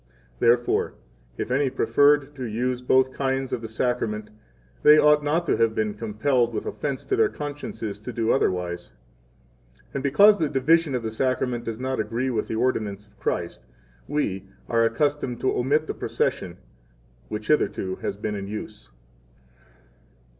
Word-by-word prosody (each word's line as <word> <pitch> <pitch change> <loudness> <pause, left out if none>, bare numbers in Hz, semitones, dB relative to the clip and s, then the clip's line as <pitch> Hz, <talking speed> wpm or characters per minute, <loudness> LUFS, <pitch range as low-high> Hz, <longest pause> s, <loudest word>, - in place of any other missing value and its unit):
Therefore, 120 +1 +2 0.4
if - - -4
any 135 +1 +2
preferred 145 +2 +3
to 135 -3 -7
use 125 +3 -2
both 130 +1 +3
kinds 135 -1 -1
of 115 - -2
the 115 - -5
Sacrament, 110 -2 -2 0.5
they 150 +1 +8
ought 150 -1 +5
not 160 +4 +1
to - - +1
have 115 -1 +2
been 105 -1 0
compelled 115 +3 0
with - - -3
offense 140 -3 -3
to 395 - 0
their 435 +1 +3
consciences 145 - -6
to 110 +4 -7
do 115 -1 0
otherwise. 90 - -1 1.0
And 140 - -2
because 200 +10 +6
the 155 -3 +1
division 150 +3 +2
12 - - +1
of 120 - -2
the - - -12
Sacrament 125 -1 -1
does 115 0 -4
not 130 +1 -2
agree 115 +5 -1
with 110 -3 -1
the - - -3
ordinance 110 -4 -1
of 105 0 -29
Christ, 85 -1 -3 0.4
we 100 -11 -2 0.2
are 115 -1 +2
accustomed 130 +1 0
to 130 - +1
omit 145 +5 +1
the - - -4
procession, - - -2 0.7
which 105 - -6
hitherto 95 -10 +1
has - - -3
been 105 +1 -4
in 100 -1 -5
use. 105 0 -8
125 Hz, 160 wpm, -25 LUFS, 110-145 Hz, 1.0 s, they